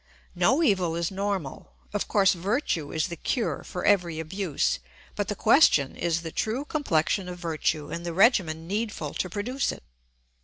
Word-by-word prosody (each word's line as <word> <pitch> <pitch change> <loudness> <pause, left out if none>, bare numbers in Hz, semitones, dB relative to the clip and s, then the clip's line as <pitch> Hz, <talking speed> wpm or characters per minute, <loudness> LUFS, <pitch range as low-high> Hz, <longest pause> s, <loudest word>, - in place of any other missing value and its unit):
No 235 - +3
evil 185 - +2
is 170 +1 -1
normal. 195 -7 -4 0.2
Of 205 - -1
course 195 -2 +4
virtue 180 - -1
is 160 +3 -1
the 170 - -5
cure 230 - -2
for 180 - -5
every 175 -5 +2
abuse; 170 0 -1 0.4
but - - -2
the - - -2
question 140 -2 +4
is 170 -1 -1
the 165 - -5
true 235 - -2
complexion 190 - 0
of 180 - -6
virtue 160 -3 -2
and 170 +1 -4
the 170 - -3
regimen 170 -5 +3
needful 205 -7 -3
to 185 - -2
produce 245 +9 -1
it. - - -10
180 Hz, 165 wpm, -26 LUFS, 165-205 Hz, 0.4 s, course